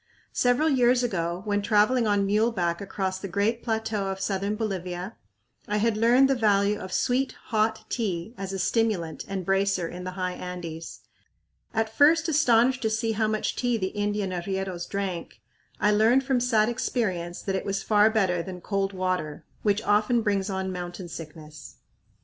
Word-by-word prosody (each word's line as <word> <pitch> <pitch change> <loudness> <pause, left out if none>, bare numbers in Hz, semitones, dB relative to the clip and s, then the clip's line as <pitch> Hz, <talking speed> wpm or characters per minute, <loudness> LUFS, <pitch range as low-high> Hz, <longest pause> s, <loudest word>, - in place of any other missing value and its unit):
Several 245 +5 +2
years 250 -3 +3
ago, 175 -5 -2
when 205 -1 0
traveling 215 +3 +3
on 205 -1 +2
muleback 200 -5 +1
across 190 -1 -3
the 195 - -5
great 205 +5 0
plateau 220 -3 -2
of 195 0 -3
southern 195 +1 -1
Bolivia, 185 -2 -4 0.5
I 210 - 0
had 220 +1 +1
learned 240 +5 +5
the 270 - +3
value 210 -3 +2
of 185 - -7
sweet, 255 +6 +1
hot 220 0 -1
tea 200 -3 -3
as 195 -3 -5
a 195 - -3
stimulant 190 -5 0
and 195 -2 -4
bracer 195 -2 +1
in 180 +2 -7
the 185 0 -5
high 185 -1 -1
Andes. 170 -3 -7 0.7
At 225 -1 -1
first 320 +3 +5
astonished 260 -4 +3
to 220 - +1
see 220 +1 0
how 220 0 +1
much 215 0 -1
tea 245 -2 0
the 190 -3 -1
Indian 205 -1 -2
arrieros 185 -1 -3
drank, 185 - -4 0.4
I 210 - +3
learned 225 +5 +4
from 265 -2 +1
sad 225 -3 +3
experience 190 -8 -2
that 195 - -1
it 190 - -2
was 195 0 -2
far 210 0 +4
better 190 -6 +1
than 180 +1 -7
cold 195 +1 -2
water, 185 -5 -2 0.2
which 210 +1 +1
often 215 +3 +2
brings 200 -2 0
on 190 -1 -2
mountain 175 0 -6
sickness. 155 -2 -10
205 Hz, 170 wpm, -26 LUFS, 185-225 Hz, 0.7 s, learned